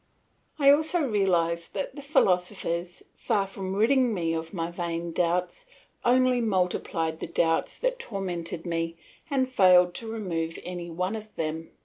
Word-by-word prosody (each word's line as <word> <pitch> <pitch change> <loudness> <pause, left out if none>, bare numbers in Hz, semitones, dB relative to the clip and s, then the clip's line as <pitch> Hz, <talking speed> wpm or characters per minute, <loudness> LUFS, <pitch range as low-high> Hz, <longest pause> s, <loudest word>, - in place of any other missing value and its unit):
I 280 -2 +7
also 315 +3 +2
realised 175 -8 +1
that 280 - -3
the 285 - -7
philosophers, 180 - 0
far 200 -2 0
from 190 -1 -5
ridding 240 +2 +3
me 165 -3 0
of 160 0 -4
my 170 -3 -3
vain 170 -1 -3
doubts, 180 - -1 0.4
only 255 0 +4
multiplied 180 -5 0
the - - -4
doubts 165 0 0
that - - -1
tormented 180 - -4
me 165 -1 -2 0.3
and 265 -3 +1
failed 180 -7 +5
to 225 - -7
remove 165 -7 -3
any 175 -1 -6
one 180 +5 -2
of 215 -1 -7
them. 160 0 -3
180 Hz, 145 wpm, -27 LUFS, 170-225 Hz, 0.4 s, I